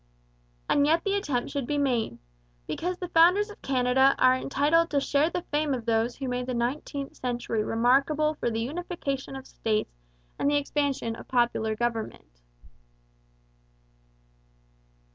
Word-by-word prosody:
And 285 Hz, 0 st, +3 dB
yet 325 Hz, +2 st, +3 dB
the 395 Hz, -, 0 dB
attempt 290 Hz, -12 st, -1 dB
should 275 Hz, -4 st, -3 dB
be 295 Hz, -, -1 dB
made, 245 Hz, -, 0 dB, 0.5 s
because 360 Hz, -, -3 dB
the 360 Hz, -1 st, -6 dB
founders 365 Hz, +6 st, +4 dB
of -, -, -14 dB
Canada 265 Hz, +1 st, +3 dB
are 255 Hz, 0 st, +5 dB
entitled 295 Hz, +6 st, +2 dB
to 285 Hz, -, +2 dB
share 285 Hz, +3 st, +2 dB
the 350 Hz, 0 st, -3 dB
fame 295 Hz, -2 st, +1 dB
of 235 Hz, -3 st, -7 dB
those 230 Hz, +1 st, +1 dB
who 270 Hz, -, -5 dB
made 250 Hz, 0 st, -2 dB
the 255 Hz, -, -2 dB
nineteenth 275 Hz, +3 st, -3 dB
century 240 Hz, -3 st, -2 dB
remarkable 275 Hz, +7 st, +2 dB
for 295 Hz, -, -2 dB
the 225 Hz, 0 st, -2 dB
unification 275 Hz, -1 st, -4 dB
of 265 Hz, 0 st, -8 dB
states 215 Hz, -, -2 dB, 0.5 s
and 280 Hz, -, +2 dB
the 290 Hz, -, +3 dB
expansion 280 Hz, -5 st, -1 dB
of -, -, -11 dB
popular 240 Hz, -3 st, +1 dB
government. 225 Hz, -, -4 dB
270 Hz, 145 wpm, -27 LUFS, 240-300 Hz, 0.5 s, are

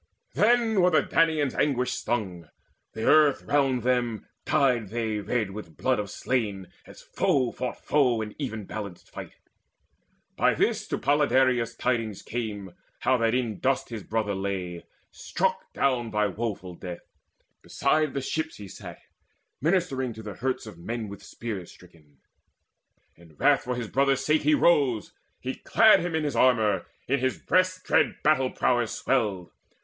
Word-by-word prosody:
Then 225 Hz, -2 st, +3 dB
were 180 Hz, -, +5 dB
the 160 Hz, -, +3 dB
Danaans 160 Hz, -4 st, +2 dB
anguish 125 Hz, -3 st, +1 dB
stung: 95 Hz, -9 st, -3 dB, 0.4 s
the 110 Hz, 0 st, -4 dB
earth 150 Hz, -3 st, +5 dB
All -, -, -16 dB
round 135 Hz, -4 st, +2 dB
them 120 Hz, -3 st, 0 dB, 0.2 s
dyed 125 Hz, -8 st, +2 dB
they 110 Hz, -1 st, -2 dB
red 110 Hz, -1 st, -1 dB
with 95 Hz, -5 st, -9 dB
blood 130 Hz, -3 st, +1 dB
of 105 Hz, -1 st, -4 dB
slain, 105 Hz, -7 st, -2 dB, 0.2 s
As -, -, -14 dB
foe 130 Hz, -3 st, +1 dB
fought 125 Hz, -1 st, -5 dB
foe 130 Hz, -6 st, +3 dB
in 105 Hz, -1 st, -5 dB
even 110 Hz, -7 st, -4 dB
balanced 100 Hz, -4 st, -8 dB
fight. -, -, -9 dB, 1.0 s
By -, -, +3 dB
this -, -, 0 dB
to -, -, -2 dB
Podaleirius 130 Hz, -5 st, +2 dB
tidings 115 Hz, -5 st, -1 dB
came 105 Hz, -6 st, -5 dB, 0.3 s
How 130 Hz, -, +3 dB
that 115 Hz, 0 st, +1 dB
in 120 Hz, -5 st, -2 dB
dust 135 Hz, 0 st, 0 dB
his 115 Hz, -3 st, -6 dB
brother 110 Hz, 0 st, -2 dB
lay, 95 Hz, -3 st, -4 dB, 0.3 s
struck -, -, -2 dB
down 125 Hz, -4 st, 0 dB
By 105 Hz, -1 st, +1 dB
woeful 100 Hz, -2 st, -4 dB
death. 90 Hz, 0 st, -9 dB, 0.5 s
Beside 155 Hz, -3 st, 0 dB
the 140 Hz, -, -1 dB
ships 160 Hz, +4 st, -3 dB
he 100 Hz, -, -9 dB
sat -, -, -10 dB, 0.6 s
Ministering 145 Hz, -7 st, 0 dB
to 110 Hz, 0 st, -10 dB
the 105 Hz, -1 st, -6 dB
hurts 130 Hz, +6 st, -3 dB
of 105 Hz, -6 st, -11 dB
men 110 Hz, +4 st, -4 dB
with 100 Hz, -, -9 dB
spears 105 Hz, -7 st, -7 dB
Stricken. 80 Hz, -5 st, -20 dB, 1.0 s
In 85 Hz, -2 st, -19 dB
wrath -, -, +3 dB
for 125 Hz, 0 st, -2 dB
his 120 Hz, -2 st, -4 dB
brother's 135 Hz, +2 st, +1 dB
sake 155 Hz, +1 st, +3 dB
he 150 Hz, +1 st, +4 dB
rose, 140 Hz, -11 st, +2 dB, 0.3 s
He -, -, -4 dB
clad -, -, +5 dB
him 175 Hz, -2 st, -2 dB
in 160 Hz, -, 0 dB
his 145 Hz, -4 st, -2 dB
armour; 110 Hz, -7 st, +3 dB, 0.2 s
in 140 Hz, +2 st, +1 dB
his 130 Hz, 0 st, 0 dB
breast 185 Hz, 0 st, +1 dB
Dread -, -, +2 dB
battle 135 Hz, -4 st, +3 dB
prowess 120 Hz, -3 st, 0 dB
swelled. 105 Hz, -9 st, -1 dB
120 Hz, 160 wpm, -26 LUFS, 105-135 Hz, 1.0 s, were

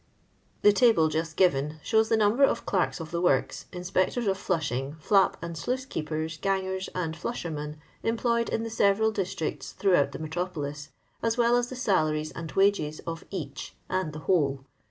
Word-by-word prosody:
The 205 Hz, -, +7 dB
table 225 Hz, -6 st, +5 dB
on 155 Hz, -, +3 dB
p. 155 Hz, -, 0 dB
429 155 Hz, -3 st, +1 dB
showa 220 Hz, 0 st, +3 dB
the 225 Hz, -, +3 dB
number 215 Hz, +5 st, +3 dB
of -, -, +3 dB
clerks 185 Hz, -2 st, 0 dB
of 160 Hz, -1 st, -7 dB
the 170 Hz, 0 st, -1 dB
works, 180 Hz, -, +1 dB
inspectors 185 Hz, +6 st, 0 dB
of 195 Hz, -1 st, +2 dB
flushing, 145 Hz, -7 st, -2 dB
flap 195 Hz, +4 st, +3 dB
and 170 Hz, 0 st, -5 dB
sluice 250 Hz, +11 st, -2 dB
keepers, 155 Hz, -, -3 dB
gangers, 190 Hz, -1 st, -1 dB
and 165 Hz, -3 st, -2 dB
flushermen 155 Hz, -7 st, -4 dB, 0.2 s
employed 235 Hz, 0 st, +1 dB
in 225 Hz, -, -1 dB
the 230 Hz, -, -5 dB
several 220 Hz, 0 st, +3 dB
districts 185 Hz, -6 st, -3 dB
throughout 180 Hz, -8 st, +3 dB
the -, -, -6 dB
metropolis, 155 Hz, -3 st, -4 dB, 0.3 s
as 230 Hz, +1 st, 0 dB
well 240 Hz, 0 st, +4 dB
as 245 Hz, 0 st, +1 dB
the 255 Hz, -, -6 dB
salaries 155 Hz, -10 st, +1 dB
and 165 Hz, -1 st, -7 dB
wages 195 Hz, -6 st, +2 dB
of 165 Hz, 0 st, -5 dB
each 140 Hz, -8 st, -6 dB, 0.2 s
and 185 Hz, -4 st, 0 dB
the 155 Hz, -, -7 dB
whole. 140 Hz, -7 st, +1 dB
180 Hz, 175 wpm, -27 LUFS, 155-210 Hz, 0.3 s, The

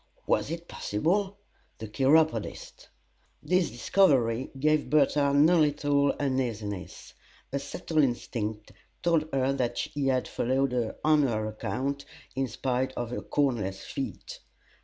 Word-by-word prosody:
Was -, -, +1 dB
it 170 Hz, +1 st, -5 dB
possible? 190 Hz, -, -1 dB, 0.4 s
The 110 Hz, -, -7 dB
Chiropodist! 155 Hz, -, +1 dB, 0.6 s
This 180 Hz, -3 st, +2 dB
discovery 125 Hz, -5 st, +2 dB
gave 155 Hz, -1 st, +2 dB
Bertha 145 Hz, 0 st, +3 dB
no 155 Hz, +5 st, +5 dB
little 145 Hz, -1 st, +2 dB
uneasiness. 115 Hz, -8 st, -3 dB, 0.4 s
A 140 Hz, -, 0 dB
subtle 155 Hz, +3 st, -3 dB
instinct 110 Hz, -5 st, -1 dB, 0.3 s
told 165 Hz, -2 st, +2 dB
her 135 Hz, 0 st, +1 dB
that 125 Hz, -3 st, -1 dB
he 145 Hz, -2 st, -2 dB
had 130 Hz, -1 st, +1 dB
followed 125 Hz, -2 st, 0 dB
on 155 Hz, -1 st, +4 dB
her 110 Hz, -3 st, -1 dB
account, 130 Hz, +6 st, -3 dB, 0.3 s
in 135 Hz, 0 st, 0 dB
spite 130 Hz, +2 st, -2 dB
of 120 Hz, -2 st, -4 dB
her -, -, -3 dB
cornless 105 Hz, -9 st, -1 dB
feet. 135 Hz, -, -6 dB
135 Hz, 120 wpm, -28 LUFS, 120-150 Hz, 0.6 s, no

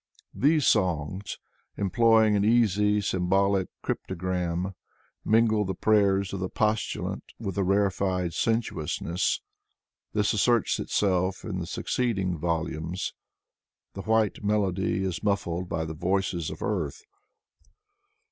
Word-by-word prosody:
These 150 Hz, +1 st, +3 dB
songs, 90 Hz, -1 st, 0 dB, 0.4 s
employing 110 Hz, +1 st, +4 dB
an 100 Hz, -, +2 dB
easy 105 Hz, -2 st, +3 dB
symbolic 95 Hz, +1 st, +1 dB, 0.2 s
cryptogram, 90 Hz, 0 st, -2 dB, 0.5 s
mingle 110 Hz, -1 st, +3 dB
the 95 Hz, -1 st, -3 dB
prayers 100 Hz, -3 st, +2 dB
of 95 Hz, -, -3 dB
the 95 Hz, 0 st, -2 dB
postulant 110 Hz, 0 st, -1 dB
with 100 Hz, -5 st, -4 dB
a 100 Hz, -, +1 dB
rarefied 95 Hz, -2 st, +1 dB
sensuousness. 90 Hz, -6 st, -1 dB, 0.7 s
This 105 Hz, -1 st, +2 dB
asserts 115 Hz, +2 st, +2 dB
itelf 95 Hz, -1 st, 0 dB
in 95 Hz, -4 st, -3 dB
the 85 Hz, -, -4 dB
succeeding 95 Hz, -5 st, -1 dB
volumes. 85 Hz, +1 st, -2 dB, 0.8 s
The 95 Hz, -, -6 dB
white 110 Hz, 0 st, +1 dB
melody 95 Hz, -2 st, 0 dB
is 95 Hz, -3 st, -2 dB
muffled 95 Hz, -4 st, -1 dB
by 80 Hz, -1 st, -2 dB
the 80 Hz, -, -5 dB
voices 85 Hz, 0 st, -1 dB
of -, -, -7 dB
earth. 445 Hz, -, -2 dB
95 Hz, 110 wpm, -27 LUFS, 90-105 Hz, 0.8 s, employing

